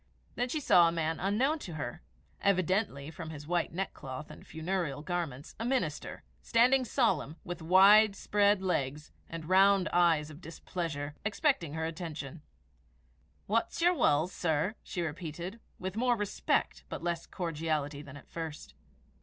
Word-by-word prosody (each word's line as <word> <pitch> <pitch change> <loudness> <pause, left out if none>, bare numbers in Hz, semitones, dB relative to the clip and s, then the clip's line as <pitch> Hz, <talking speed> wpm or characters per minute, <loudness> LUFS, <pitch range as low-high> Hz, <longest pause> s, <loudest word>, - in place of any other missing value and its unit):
Then 245 +1 -1
she 310 - -1
saw 175 - +6
a - - +2
man 165 -1 -1
unknown 250 - +1
to 175 - -7
her 155 +3 -5 0.4
evidently, 185 -6 +1
from 165 -1 -7
his 150 -2 -8
white 175 +2 0
neckcloth 150 -6 -5
and - - -13
funereal 160 -3 -2
garments, 160 -6 -4
a - - -2
minister 240 - -2 0.2
standing 250 +3 +4
solemn, 195 - +1
with 175 -2 -6
wide 195 +5 +7
spread 205 -1 +2
legs, 150 -4 -1 0.2
and 165 -2 -6
round 195 +1 +5
eyes 165 -4 +3
of 155 +3 -12
displeasure, 165 -3 -5
expecting 205 - +1
her 160 0 -1
attention. 160 -2 -6 1.0
"What's 225 +3 0
yer 350 +2 +4
wull, 155 - +3
sir?" 175 0 0
she 175 - -4
repeated, 170 +5 -5 0.2
with 185 +1 -5
more 245 +2 +2
respect, 210 -2 -1
but - - -6
less 170 -1 -2
cordiality 155 -4 -2
than 145 -1 -10
at 140 - -15
first. 160 -3 -7
175 Hz, 145 wpm, -31 LUFS, 155-200 Hz, 1.0 s, wide